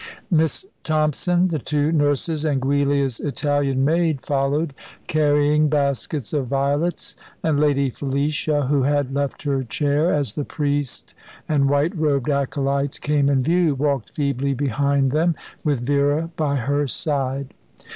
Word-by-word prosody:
Miss 160 Hz, -, +1 dB, 0.2 s
Thompson, 160 Hz, +4 st, +1 dB
the 160 Hz, -3 st, -1 dB
two 150 Hz, +3 st, 0 dB
nurses, 150 Hz, 0 st, +1 dB
and 145 Hz, -4 st, +1 dB
Giulia's 140 Hz, -1 st, +1 dB
Italian 140 Hz, -1 st, 0 dB
maid 160 Hz, -3 st, +1 dB
followed, 140 Hz, +2 st, 0 dB, 0.3 s
carrying 150 Hz, 0 st, +2 dB
baskets 140 Hz, -2 st, -1 dB
of 140 Hz, -4 st, 0 dB
violets; 140 Hz, +6 st, -1 dB, 0.3 s
and 155 Hz, -3 st, +1 dB
Lady 140 Hz, -3 st, +2 dB
Felicia, 145 Hz, +3 st, -1 dB
who 140 Hz, +1 st, +2 dB
had 140 Hz, 0 st, +1 dB
left 140 Hz, 0 st, -2 dB
her 140 Hz, -2 st, 0 dB
chair 145 Hz, +7 st, 0 dB
as 145 Hz, -3 st, 0 dB
the 150 Hz, -, -3 dB
priest 145 Hz, -2 st, -2 dB, 0.3 s
and 140 Hz, -3 st, +2 dB
white 145 Hz, +6 st, +1 dB
robed 145 Hz, -4 st, +1 dB
acolytes 140 Hz, 0 st, -1 dB
came 145 Hz, -1 st, +1 dB
in 135 Hz, -2 st, +2 dB
view, 170 Hz, 0 st, +2 dB
walked 140 Hz, -3 st, -1 dB
feebly 140 Hz, -1 st, -1 dB
behind 140 Hz, 0 st, +1 dB
them, 160 Hz, +3 st, +2 dB, 0.3 s
with 145 Hz, -5 st, 0 dB
Vera 145 Hz, +5 st, +1 dB
by 150 Hz, -3 st, 0 dB
her 140 Hz, +3 st, 0 dB
side. 135 Hz, -1 st, -2 dB
145 Hz, 135 wpm, -22 LUFS, 140-150 Hz, 0.3 s, carrying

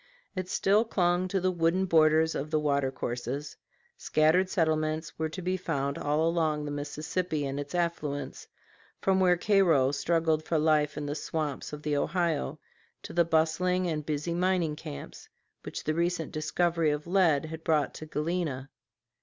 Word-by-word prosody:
It 185 Hz, -1 st, -4 dB
still 205 Hz, +3 st, +3 dB
clung 180 Hz, -4 st, +1 dB
to 195 Hz, +1 st, 0 dB
the 185 Hz, 0 st, +1 dB
wooded 175 Hz, +2 st, +1 dB
borders 160 Hz, -1 st, +4 dB
of 145 Hz, +2 st, -3 dB
the 155 Hz, 0 st, +1 dB
water 140 Hz, -3 st, +1 dB
courses; 125 Hz, +3 st, -4 dB, 0.4 s
scattered 160 Hz, +5 st, +2 dB
settlements 155 Hz, -2 st, 0 dB
were 160 Hz, 0 st, 0 dB
to 185 Hz, +3 st, -7 dB
be 185 Hz, +1 st, 0 dB
found 140 Hz, -6 st, -2 dB
all 150 Hz, +2 st, +1 dB
along 160 Hz, -3 st, 0 dB
the 145 Hz, -, -4 dB
Mississippi 150 Hz, +2 st, -3 dB
and 135 Hz, +1 st, -3 dB
its 145 Hz, +3 st, -5 dB
affluents, 165 Hz, -5 st, -2 dB, 0.5 s
from 190 Hz, -1 st, +2 dB
where 180 Hz, -1 st, +4 dB
Cairo 175 Hz, -9 st, +3 dB
struggled 160 Hz, +2 st, +1 dB
for 160 Hz, +1 st, 0 dB
life 150 Hz, -1 st, +2 dB
in 150 Hz, -, -3 dB
the 145 Hz, -, -2 dB
swamps 150 Hz, -2 st, -3 dB
of 150 Hz, 0 st, -8 dB
the 150 Hz, -1 st, 0 dB
Ohio 170 Hz, -, 0 dB, 0.5 s
to -, -, -8 dB
the 170 Hz, -, +4 dB
bustling 170 Hz, +3 st, +1 dB
and 155 Hz, -3 st, -2 dB
busy 150 Hz, +3 st, -2 dB
mining 175 Hz, -3 st, +1 dB
camps 70 Hz, -, -9 dB, 0.3 s
which -, -, -6 dB
the 155 Hz, -, 0 dB
recent 170 Hz, -1 st, -1 dB
discovery 165 Hz, +1 st, +1 dB
of 150 Hz, 0 st, -2 dB
lead 170 Hz, -5 st, +3 dB
had 160 Hz, +1 st, -7 dB
brought 155 Hz, -3 st, +1 dB
to 155 Hz, -, -8 dB
Galena. 150 Hz, -4 st, -2 dB
160 Hz, 165 wpm, -29 LUFS, 150-175 Hz, 0.5 s, borders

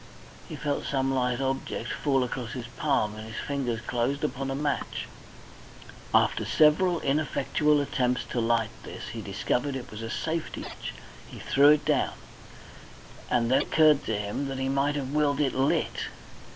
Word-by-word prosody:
He -, -, -5 dB
felt 145 Hz, -1 st, -2 dB
some 135 Hz, -1 st, 0 dB
light 125 Hz, -1 st, +1 dB
object 135 Hz, 0 st, -2 dB
fall 135 Hz, -3 st, +1 dB
across 125 Hz, -1 st, -4 dB
his 125 Hz, -2 st, -5 dB
palm 105 Hz, 0 st, +1 dB
and 110 Hz, 0 st, -8 dB
his 110 Hz, -, -8 dB
fingers 125 Hz, -5 st, -2 dB
closed 125 Hz, +5 st, -1 dB
upon 135 Hz, -2 st, -2 dB
a 135 Hz, -, -1 dB
match. 145 Hz, 0 st, -2 dB, 1.1 s
After -, -, +3 dB
several 165 Hz, +3 st, +4 dB
ineffectual 150 Hz, +1 st, +1 dB
attempts 125 Hz, -3 st, 0 dB
to 120 Hz, -, 0 dB
light 115 Hz, -1 st, +1 dB
this, -, -, -8 dB
he -, -, -5 dB
discovered 135 Hz, +2 st, -1 dB
it 125 Hz, -1 st, -6 dB
was 110 Hz, +1 st, -7 dB
a 115 Hz, -, -5 dB
safety 160 Hz, +6 st, -3 dB
match. -, -, -7 dB, 0.3 s
He -, -, -11 dB
threw 140 Hz, +2 st, +5 dB
it 150 Hz, 0 st, +4 dB
down, -, -, +2 dB, 1.2 s
and 120 Hz, 0 st, +2 dB
then 130 Hz, -, +5 dB
it -, -, -4 dB
occurred 155 Hz, -2 st, +5 dB
to 110 Hz, -, -1 dB
him 105 Hz, +7 st, -3 dB
that 135 Hz, -1 st, -4 dB
he 135 Hz, 0 st, -1 dB
might 140 Hz, +2 st, +1 dB
have 135 Hz, -2 st, -3 dB
willed 150 Hz, -1 st, +2 dB
it 140 Hz, -3 st, +2 dB
lit. 135 Hz, +2 st, 0 dB
135 Hz, 170 wpm, -27 LUFS, 125-145 Hz, 1.2 s, threw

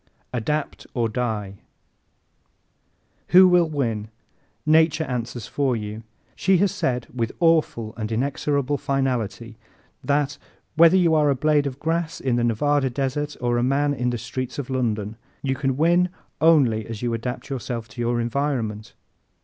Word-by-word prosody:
Adapt 145 Hz, +5 st, -2 dB
or 120 Hz, -2 st, +1 dB
Die 110 Hz, -4 st, -3 dB
¶ -, -, -33 dB, 1.7 s
Who 185 Hz, +1 st, +9 dB
will 175 Hz, -2 st, +4 dB
win? 115 Hz, -8 st, -2 dB, 0.6 s
Nature 160 Hz, +1 st, +4 dB
answers 120 Hz, -4 st, -4 dB
for 135 Hz, -3 st, 0 dB
you. 105 Hz, 0 st, -5 dB, 0.3 s
She 190 Hz, 0 st, +3 dB
has 195 Hz, +2 st, +2 dB
said 125 Hz, -12 st, -1 dB
with 115 Hz, -2 st, -2 dB
awful 155 Hz, -10 st, +2 dB
and 110 Hz, -1 st, -4 dB
inexorable 140 Hz, +3 st, 0 dB
finality 120 Hz, -4 st, -2 dB, 0.4 s
that, 145 Hz, 0 st, 0 dB, 0.4 s
whether 165 Hz, +3 st, +6 dB
you 170 Hz, -3 st, +3 dB
are 150 Hz, -2 st, +4 dB
a 140 Hz, -, +2 dB
blade 145 Hz, +1 st, +2 dB
of 130 Hz, -1 st, -5 dB
grass 165 Hz, +2 st, -2 dB
on 130 Hz, -3 st, 0 dB
the 120 Hz, -, +1 dB
Nevada 135 Hz, +4 st, +1 dB
desert 140 Hz, +3 st, -2 dB
or 120 Hz, -1 st, +1 dB
a -, -, +1 dB
man 140 Hz, +3 st, +2 dB
in 125 Hz, -3 st, -1 dB
the 120 Hz, -, -2 dB
streets 125 Hz, +2 st, -5 dB
of 135 Hz, -2 st, -5 dB
London, 110 Hz, -4 st, -1 dB, 0.3 s
you 135 Hz, -1 st, 0 dB
can 135 Hz, -1 st, -1 dB
win 175 Hz, +3 st, +3 dB, 0.3 s
only 135 Hz, -10 st, +4 dB
as 115 Hz, 0 st, -6 dB
you 120 Hz, -1 st, 0 dB
adapt 125 Hz, +4 st, -4 dB
yourself 120 Hz, -3 st, -4 dB
to 120 Hz, +2 st, -7 dB
your 120 Hz, 0 st, 0 dB
environment. 115 Hz, -4 st, -2 dB
130 Hz, 155 wpm, -23 LUFS, 115-150 Hz, 1.7 s, Who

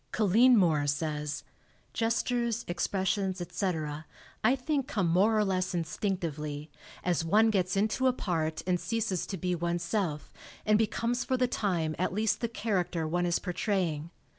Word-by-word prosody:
Colleen 225 Hz, +4 st, +5 dB
Moore 155 Hz, -7 st, +3 dB
says, 150 Hz, 0 st, -2 dB, 0.5 s
"Gestures, 235 Hz, 0 st, 0 dB
expressions, 190 Hz, +2 st, -1 dB
etc., 160 Hz, -4 st, -3 dB, 0.4 s
I 250 Hz, +5 st, +5 dB
think 275 Hz, 0 st, -1 dB
come 190 Hz, -5 st, 0 dB
more 195 Hz, +7 st, +3 dB
or 210 Hz, -, +3 dB
less 185 Hz, -1 st, 0 dB
instinctively, 160 Hz, -4 st, -3 dB, 0.3 s
as 175 Hz, -2 st, +1 dB
one 215 Hz, +7 st, +4 dB
gets 185 Hz, -2 st, 0 dB
into 220 Hz, +6 st, +2 dB
a -, -, +5 dB
part 160 Hz, -8 st, -2 dB
and 180 Hz, -1 st, +1 dB
ceases 210 Hz, -5 st, -1 dB
to 195 Hz, -, -4 dB
be 180 Hz, +1 st, -1 dB
oneself 170 Hz, -1 st, -2 dB, 0.3 s
and 215 Hz, 0 st, +4 dB
becomes 235 Hz, +2 st, 0 dB
for 260 Hz, -, 0 dB
the 250 Hz, 0 st, +2 dB
time 175 Hz, -9 st, -1 dB
at 185 Hz, -, 0 dB
least 215 Hz, +1 st, 0 dB
the 235 Hz, -, 0 dB
character 185 Hz, -7 st, -1 dB
one 175 Hz, +2 st, 0 dB
is 170 Hz, -, +2 dB
portraying. 175 Hz, -4 st, -1 dB
185 Hz, 150 wpm, -30 LUFS, 165-220 Hz, 0.5 s, Colleen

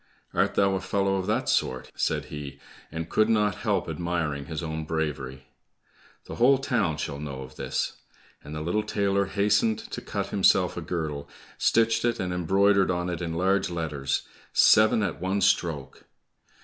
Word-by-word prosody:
"Art -, -, +1 dB
thou 100 Hz, -1 st, +3 dB
a 95 Hz, -, -1 dB
fellow 95 Hz, 0 st, 0 dB
of 95 Hz, 0 st, -3 dB
that 105 Hz, -, 0 dB
sort?" 65 Hz, -, 0 dB
said -, -, -1 dB
he, 75 Hz, -2 st, -7 dB, 0.3 s
and 80 Hz, +1 st, -4 dB
could 110 Hz, +1 st, +2 dB
not 105 Hz, -3 st, +2 dB
help -, -, 0 dB
admiring 80 Hz, -5 st, -2 dB
his 80 Hz, +1 st, -5 dB
own 80 Hz, -1 st, -3 dB
bravery. 75 Hz, -5 st, -3 dB, 0.8 s
"The -, -, -8 dB
whole 130 Hz, +3 st, +5 dB
town 120 Hz, -, 0 dB
shall 70 Hz, -1 st, -4 dB
know 70 Hz, -3 st, -6 dB
of 65 Hz, 0 st, -12 dB
this!" -, -, -3 dB, 0.5 s
And 75 Hz, +2 st, -8 dB
the 75 Hz, -, -4 dB
little 85 Hz, +7 st, 0 dB
tailor 100 Hz, -2 st, 0 dB
hastened 105 Hz, +2 st, +2 dB
to -, -, -7 dB
cut -, -, -4 dB
himself -, -, +3 dB
a -, -, -4 dB
girdle, 75 Hz, -4 st, -4 dB, 0.3 s
stitched 115 Hz, 0 st, +3 dB
it, 120 Hz, 0 st, +1 dB
and 90 Hz, -1 st, -2 dB
embroidered 95 Hz, +3 st, +3 dB
on 90 Hz, 0 st, -1 dB
it 85 Hz, 0 st, -4 dB
in 85 Hz, -1 st, -3 dB
large 95 Hz, +3 st, +1 dB
letters, 75 Hz, -5 st, -2 dB, 0.3 s
"Seven 110 Hz, 0 st, +5 dB
at 100 Hz, -, -3 dB
one 95 Hz, +2 st, 0 dB
stroke!" 85 Hz, -7 st, 0 dB
90 Hz, 170 wpm, -26 LUFS, 75-100 Hz, 0.8 s, whole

